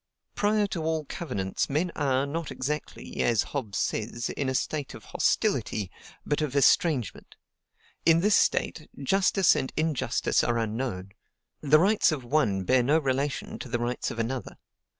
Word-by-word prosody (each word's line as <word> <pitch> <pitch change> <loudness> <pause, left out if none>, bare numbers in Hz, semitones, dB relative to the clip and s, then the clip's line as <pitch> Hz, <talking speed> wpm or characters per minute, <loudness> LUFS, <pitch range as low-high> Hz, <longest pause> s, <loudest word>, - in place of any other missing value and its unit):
"Prior 210 0 +2
to 185 -4 -4
all 160 -1 -1
covenants, 100 - -3
men 160 +5 0
are, 135 -1 +1
not 160 +2 -4
exactly, 150 +4 -4
as 115 -3 +2
Hobbes 120 -9 -4
says, 115 +2 -2
in 140 -2 -2
a 130 - -2
state 145 +1 -2
of - - -12
HOSTILITY, 100 -4 0 0.3
but 145 +1 0
of 145 -3 -2
ESTRANGEMENT. 140 - +2 0.7
In 165 0 +5
this 210 +3 +3
state, 155 - +1
justice 190 +5 +3
and 130 - -2
injustice 155 -3 +1
are 120 - +1
unknown; 110 -4 -3 0.5
the 150 0 +5
rights 195 +3 +3
of 145 -5 -3
one 120 -8 +1
bear 130 +6 +3
no 145 +6 +3
relation 140 -1 -2
to - - -7
the 120 - 0
rights 120 +1 -2
of - - -7
another. 120 +3 -3
140 Hz, 155 wpm, -27 LUFS, 120-160 Hz, 0.7 s, In